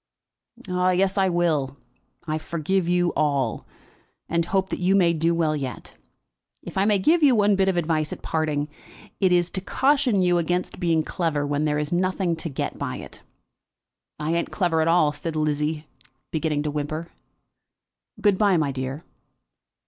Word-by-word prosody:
"Yes, 185 +1 +1
I 190 -2 +2
will. 155 -6 0 0.5
I 155 -1 -2
forgive 170 +3 -1
you 175 0 +2
all, 140 -6 0 0.6
and 170 0 0
hope 190 +1 -1
you 185 +2 +2
may 175 -4 +4
do 165 +1 +1
well 160 -2 +1
yet. 135 -4 -6 0.7
If - - -9
I 195 +1 +2
may 210 -1 +4
give 320 - +3
you 275 -5 +5
one 205 -1 +4
bit 195 0 +2
of 190 -2 +1
advice 155 -2 0
at - - -7
parting, 155 -2 -1 0.5
it 190 -2 +3
is 175 0 +2
to 190 - -3
caution 260 -3 +2
you 175 -1 +3
against 175 +2 -2
being 165 -3 +2
clever 155 -3 -1
when 145 +1 0
there 150 -1 +1
is 150 0 -2
nothing 185 0 0
to 165 - -5
get 135 - -4
by - - -3
it." - - -10 1.0
"I 155 +2 -1
ain't 170 0 -1
clever 175 -4 +1
at 160 - +1
all," 165 -3 +4
said 155 +2 -5
Lizzie, 150 0 -1 0.5
beginning 155 -2 -1
to 150 - -2
whimper. 155 +3 -4 1.1
"Good 205 -3 +2
bye, 200 -4 +4
my 150 -3 0
dear." 130 +3 -5
170 Hz, 165 wpm, -24 LUFS, 150-185 Hz, 1.1 s, you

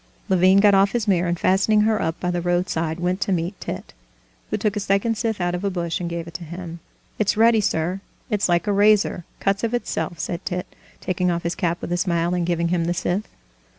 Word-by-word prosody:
Levin 185 +1 +5
got 205 0 +6
off 195 0 +4
his 235 -3 -1
mare, 180 -3 +2
and 170 0 -1
fastening 200 +3 +3
her 215 0 +2
up 160 +1 -2
by 180 - -1
the 175 0 -1
roadside 170 -2 -1
went 180 +2 -1
to 195 - 0
meet 175 +1 0
Tit, - - -6 0.6
who - - -1
took 210 -1 -1
a - - 0
second 200 +3 +1
scythe 220 -1 -2
out 175 0 0
of 180 +2 -3
a 200 - +1
bush 170 -3 -2
and 175 -1 -3
gave 170 -1 -4
it 170 - -11
to 180 - -6
him. 170 0 -7 0.4
"It's 210 -1 +1
ready, 225 0 +5
sir; 180 0 -1 0.3
it's 210 -4 0
like 175 -1 +2
a 205 - +1
razor, 205 -3 +3
cuts 195 +1 0
of 230 +1 0
itself," 195 -7 -3
said 175 +2 -4
Tit, 180 -1 -3 0.4
taking 180 -1 0
off 170 -1 -1
his 170 +1 -1
cap 175 -2 -1
with - - -5
a 175 - +1
smile 175 -1 0
and 175 -1 0
giving 170 -1 0
him 170 -1 +1
the 175 +1 -1
scythe. 180 +4 -1
180 Hz, 235 wpm, -22 LUFS, 170-200 Hz, 0.6 s, got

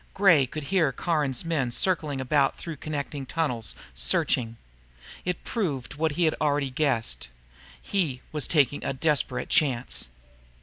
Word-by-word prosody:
Gray 175 -9 +5
could 155 +4 -6
hear 165 -7 +4
Caron's 150 -2 0
men 150 -7 0
circling 150 0 0
about 135 +1 +2
through 165 -3 -6
connecting 145 -1 -4
tunnels, 125 -9 -2 0.2
searching. 115 - +1 0.7
It 180 -1 -2
proved 145 - -2
what 155 +1 0
he 175 - 0
had 155 - +3
already 145 -3 +1
guessed. 130 - 0 0.5
He 160 -11 -1
was 150 -2 +2
taking 145 -3 +2
a - - -1
desperate 135 -3 0
chance. 130 - +2
145 Hz, 135 wpm, -26 LUFS, 130-160 Hz, 0.7 s, Gray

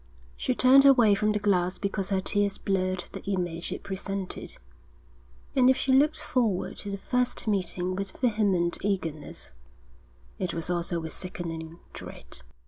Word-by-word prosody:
She 255 - -1
turned 260 +2 +7
away 250 -7 +6
from 210 +1 +2
the 210 - +1
glass 185 -3 +1
because 200 -1 -2
her 195 -2 +1
tears 205 0 +1
blurred 185 -2 -1
the - - -7
image 175 -4 -2
it - - -5
presented; 195 0 -4 1.0
and 255 -1 +6
if 260 - +4
she 260 0 +1
looked 300 +4 +4
forward 230 -10 0
to 205 - -6
the 200 - -3
first 250 +3 -1
meeting 185 -2 0
with 195 0 -5
vehement 205 -8 +1
eagerness, 165 -7 -3 0.9
it 180 -3 -2
was 165 +1 -2
also 170 0 -1
with 160 -1 -5
sickening 165 -3 -6 0.2
dread. - - -8
195 Hz, 150 wpm, -27 LUFS, 180-215 Hz, 1.0 s, turned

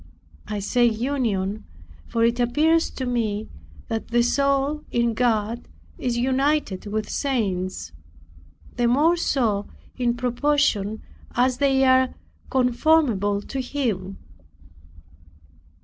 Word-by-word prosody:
I 210 0 -3
say 225 +5 +1
union, 220 -4 0 0.4
for 230 - 0
it 235 +1 +1
appears 310 +7 +2
to 260 - -5
me 220 -4 -1 0.4
that 225 -1 -3
the 240 0 +2
soul 275 +3 +1
in 235 -1 +1
God 230 -1 0 0.3
is 245 -2 -1
united 265 -5 0
with 210 0 -2
saints, 185 - -2 0.9
the 240 -1 +2
more 295 +8 +4
so 225 -11 0 0.3
in 240 -2 0
proportion 245 -4 0 0.3
as 250 +1 +2
they 270 -1 +3
are 260 0 +3 0.3
conformable 250 -6 +2
to 270 +4 -4
Him. 220 -8 -3
240 Hz, 105 wpm, -23 LUFS, 215-270 Hz, 0.9 s, more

